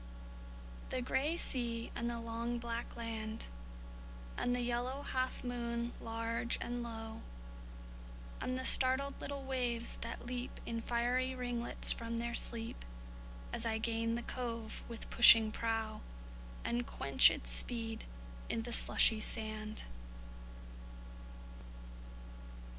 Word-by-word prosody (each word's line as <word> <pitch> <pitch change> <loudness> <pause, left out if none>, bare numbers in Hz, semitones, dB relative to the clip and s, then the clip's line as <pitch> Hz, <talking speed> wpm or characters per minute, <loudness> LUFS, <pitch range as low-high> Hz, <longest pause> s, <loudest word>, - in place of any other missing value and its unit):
The 255 - -1
gray 280 +6 +1
sea 235 -6 0
and 235 0 -1
the 235 -1 -3
long 230 +1 -2
black 235 0 -4
land; 225 -1 -3 0.9
And 245 - +1
the 245 - 0
yellow 245 +3 -1
half 255 -1 -1
moon 235 -1 -2
large 230 +1 -1
and 245 0 -3
low; 225 -1 -6 1.2
And 255 0 -1
the 260 - -4
startled 265 +2 +5
little 280 -1 -4
waves 245 -3 0
that 230 +1 -6
leap 245 0 -4
In 230 0 -2
fiery 245 +3 +1
ringlets 245 -2 +2
from 230 0 -2
their 235 0 -2
sleep, 230 -1 -3 0.7
As 230 - -1
I 225 -1 +1
gain 230 +1 0
the 240 - -3
cove 230 -3 -4
with 230 -1 -7
pushing 225 -2 +8
prow, 225 -1 -2 0.6
And 240 0 0
quench - - +5
its - - -3
speed 225 -2 0 0.4
i' - - 0
the 230 +1 -3
slushy 220 -1 +5
sand. 215 -1 0
235 Hz, 120 wpm, -35 LUFS, 230-245 Hz, 1.2 s, pushing